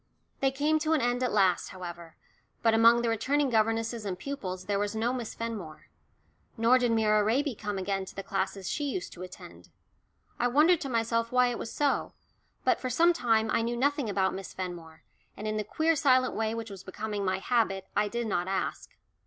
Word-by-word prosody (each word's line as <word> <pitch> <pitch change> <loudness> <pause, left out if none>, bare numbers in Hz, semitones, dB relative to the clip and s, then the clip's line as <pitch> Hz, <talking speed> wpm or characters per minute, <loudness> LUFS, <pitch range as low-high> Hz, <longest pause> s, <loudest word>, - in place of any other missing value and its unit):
They 270 - +3
came 295 +4 +1
to 310 +1 +1
an 310 - +2
end 245 +1 0
at 250 - +1
last, 190 -4 +3
however, 175 -3 -9 0.5
but 225 -1 +4
among 230 +1 +6
the 235 - +1
returning 270 +5 +1
governesses 225 +1 +1
and 190 -3 -3
pupils 185 -7 -5
there 200 -1 0
was 205 +1 -2
no 230 +3 0
Miss 240 -4 -5
Fenmore. 210 -9 -6 0.7
Nor 235 +3 +5
did 245 -2 +1
Myra 215 -2 +3
Raby 260 +6 +1
come 205 -2 -4
again 195 0 -2
to - - -12
the 195 - -5
classes 195 -1 -3
she 295 - -2
used 320 +6 -4
to 175 - -11
attend. 185 0 -11 0.7
I 245 - +3
wondered 305 +7 +4
to 275 - -4
myself 230 -1 0
why 250 0 +4
it 240 - -4
was 225 - -5
so, 290 -2 0 0.5
but - - +2
for 255 - -3
some 335 +8 +4
time 225 -6 +1
I - - +2
knew 235 +1 -2
nothing 280 -2 +1
about 190 -1 +1
Miss 195 -1 -7
Fenmore, 175 -3 -7 0.3
and 215 - -5
in 215 0 -1
the 215 - -1
queer 320 +9 +1
silent 255 -3 +3
way 220 0 -1
which 225 -2 -5
was 190 -1 -9
becoming 205 +2 -4
my 190 -1 0
habit 195 -3 0
I 210 0 +2
did 235 +3 -3
not 180 -4 -1
ask. 190 0 -3
225 Hz, 205 wpm, -29 LUFS, 195-250 Hz, 0.7 s, among